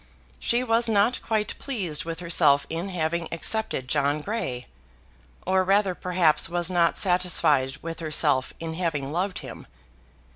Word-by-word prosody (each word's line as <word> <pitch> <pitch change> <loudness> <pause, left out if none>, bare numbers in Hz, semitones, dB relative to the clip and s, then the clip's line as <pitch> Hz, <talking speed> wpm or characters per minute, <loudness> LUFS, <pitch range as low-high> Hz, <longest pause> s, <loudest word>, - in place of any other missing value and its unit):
She 240 +1 +1
was 230 -1 +1
not 215 +3 +2
quite 215 -2 -1
pleased 190 - -2
with 165 0 -5
herself 145 -5 +3
in 170 +4 -3
having 170 -1 -2
accepted 170 - -1
John 145 +2 +1
Grey, 150 - -4 0.8
or 190 0 +2
rather 195 0 +2
perhaps 175 -3 +1
was 175 +1 -1
not 170 -2 +2
satisfied 165 -7 +2
with 165 0 -6
herself 150 -4 0
in 165 -1 -5
having 155 -5 -2
loved 185 +4 -2
him. - - -10
170 Hz, 140 wpm, -25 LUFS, 155-195 Hz, 0.8 s, herself